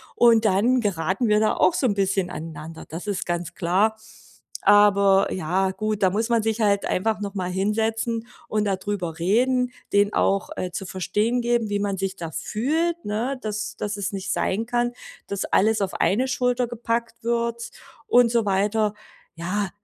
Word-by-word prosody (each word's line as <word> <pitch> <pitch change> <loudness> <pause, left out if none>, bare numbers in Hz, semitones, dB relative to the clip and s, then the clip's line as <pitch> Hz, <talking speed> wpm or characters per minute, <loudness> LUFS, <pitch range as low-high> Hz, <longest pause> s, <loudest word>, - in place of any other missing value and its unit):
und 230 -2 +5
dann 215 +6 +3
geraten 200 +3 0
wir 210 0 +4
da 215 - +2
auch 185 - +3
so 265 - 0
'n 220 - +3
bisschen 195 -2 0
aneinander. 160 -1 -8
Das 170 +6 -7
ist 200 -2 -2
ganz 175 0 -3
klar. 195 +5 +1 0.7
Aber, 200 -1 +5
ja, 185 +2 0
gut, 210 +1 -2
da 185 - +4
muss 220 +3 -1
man 230 -2 +2
sich 225 +1 -1
halt 200 -1 +2
einfach 215 +3 0
noch 200 -1 -5
mal 185 -3 -3
hinsetzen 220 +4 -1 0.2
und 215 -1 0
da 200 -1 +1
drüber 185 -4 -4
reden, 250 +8 +2 0.2
denen 205 +1 +3
auch, 195 0 +1
äh, 185 - -3
zu 185 +2 -5
verstehen 210 +6 -1
geben, 240 -1 +1
wie 205 0 0
man 200 -1 -1
sich 195 0 -2
da 170 -4 -6
fühlt, 310 - -1
ne? 235 +6 -2
Dass 215 0 -4
dass 205 0 -3
es 200 0 -2
nicht 195 0 -4
sein 215 +3 -1
kann, 240 0 0 0.3
dass 200 -1 -3
alles 220 +2 +2
auf 195 -1 -2
eine 250 +7 +1
Schulter 250 -1 0
gepackt 235 -1 -3
wird 235 0 -1 0.3
und 245 -1 +5
so 230 -1 +1
weiter. 205 +2 +1 0.4
Ja, 185 +5 -2
210 Hz, 180 wpm, -24 LUFS, 190-230 Hz, 0.7 s, und